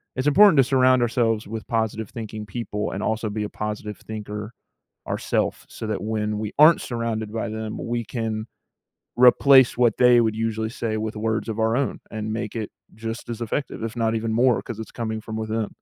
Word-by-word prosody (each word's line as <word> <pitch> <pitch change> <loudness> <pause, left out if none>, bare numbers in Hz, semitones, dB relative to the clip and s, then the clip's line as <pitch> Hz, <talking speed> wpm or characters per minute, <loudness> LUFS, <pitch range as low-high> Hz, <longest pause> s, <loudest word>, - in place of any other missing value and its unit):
it's 130 +2 -1
important 190 +1 +7
to 135 - +7
surround 130 -1 +4
ourselves 115 -3 +1
with 110 0 -6
positive-thinking 110 -1 -3
people 105 0 -3
and 95 - -4
also 110 0 -1
be 105 0 -3
a 105 - -4
positive 105 -1 -5
thinker 105 0 -7 0.6
ourself, - - -1
so 110 - -7
that 105 - -2
when 105 -1 -2
we 105 -1 -4
aren't 160 +2 +8
surrounded 115 -3 -3
by 115 0 -2
them 110 0 -5
we 120 0 -2
can 110 -1 -3 0.7
replace 130 +1 +6
what 120 -3 +3
they 125 -1 +6
would 110 -1 0
usually 110 0 -2
say 115 -3 -3
with 110 0 -3
words 110 +1 -1
of 110 - -5
our 110 +1 +2
own 140 -1 -1
and 110 0 -4
make 115 0 -4
it 110 -2 -3 0.2
just 115 +2 -6
as 120 0 -4
effective, 115 +1 -3
if 115 - -4
not 115 -1 0
even 110 0 -1
more 120 +1 +3
'cause 115 - -7
it's 110 - -7
coming 110 -2 -4
from 110 0 -7
within. 110 -1 -2
110 Hz, 195 wpm, -24 LUFS, 110-120 Hz, 0.7 s, aren't